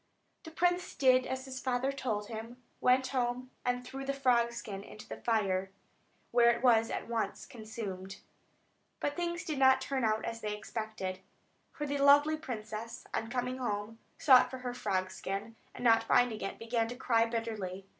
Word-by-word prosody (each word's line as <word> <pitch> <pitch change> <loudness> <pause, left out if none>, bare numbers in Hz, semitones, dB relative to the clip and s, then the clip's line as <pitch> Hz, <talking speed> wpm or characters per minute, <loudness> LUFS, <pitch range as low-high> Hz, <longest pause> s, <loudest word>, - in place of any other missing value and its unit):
The - - -7
prince 355 +2 0
did 255 -1 +4
as 260 0 -3
his 260 -1 -6
father 255 +1 0
told 220 -7 -2
him, 225 +2 -7 0.2
went 255 +1 +4
home, 250 0 -1
and 245 0 -1
threw 270 +2 -6
the 275 0 -2
frog 245 -3 +3
skin 215 -4 -6
into 210 - -11
the - - -8
fire, 195 -5 +1 0.6
where 235 0 +6
it 235 +1 +1
was 230 -2 +5
at - - -4
once 230 -1 -2
consumed. 205 -4 -7 0.8
But 290 - -1
things 345 0 -2
did 305 -6 -3
not 265 0 +6
turn 265 -1 -2
out 220 -1 +1
as 230 0 -4
they 210 -1 -3
expected; 210 -4 -5 0.5
for 295 - -4
the 285 0 -2
lovely 290 +2 +6
princess, 230 -5 -6
on 225 - -2
coming 250 +1 -2
home, 215 -2 -3 0.2
sought 255 -3 +6
for 260 - -6
her 245 - -2
frog 190 -5 -1
skin, 200 +4 -5 0.2
and - - -7
not 230 -2 +6
finding 230 -2 +3
it, 195 - -4
began 230 0 0
to 245 - -6
cry 230 -2 +2
bitterly. 215 -5 -4
235 Hz, 175 wpm, -32 LUFS, 220-260 Hz, 0.8 s, where